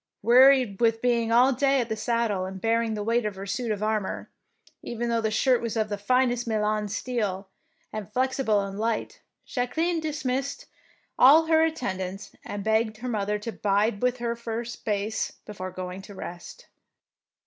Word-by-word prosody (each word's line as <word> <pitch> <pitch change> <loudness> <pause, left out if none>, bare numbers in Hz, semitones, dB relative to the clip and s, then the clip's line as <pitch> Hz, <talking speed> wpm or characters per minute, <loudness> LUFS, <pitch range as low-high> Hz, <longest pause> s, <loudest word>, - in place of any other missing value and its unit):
Wearied 250 -2 +5
with 225 -1 +3
being 235 -1 +1
all 250 +3 +5
day 275 +1 +2
in 235 - -3
the 220 - -2
sad 230 +1 0
dle 190 -2 -1
and 190 0 -7
bearing 225 +1 +1
the 210 - -3
weight 230 +2 +1
of 210 -2 -3
her 195 +1 -7
suit 230 +4 -3
of 210 0 -2
armour, 215 -2 -2 0.5
even 235 0 -3
though 230 -1 +1
the 220 - 0
shirt 250 +3 +2
was 230 -1 -3
of 215 -1 0
the 205 - -1
finest 245 +2 +1
Milan 215 -1 0
steel 205 -3 -3 0.4
and 215 -1 -6
fiexible 250 -5 +1
and 195 +1 -7
light, 225 +1 -2 0.2
Jacqueline 320 +7 -1
dismissed 285 - -3 0.5
all 300 +6 +8
her 320 0 +4
at 320 0 +1
tendants, 195 -5 -4
and 205 -1 -5
begged 220 0 +1
her 250 +3 -5
mother 210 -2 -1
to 210 +3 -5
bide 205 0 0
with 250 0 +1
her 235 -1 -2
for 230 0 -4
a - - -8
space 215 -2 -3
before 190 -3 -6
going 185 +1 -6
to 200 +1 -12
rest. 180 - -9
225 Hz, 180 wpm, -26 LUFS, 205-250 Hz, 0.5 s, all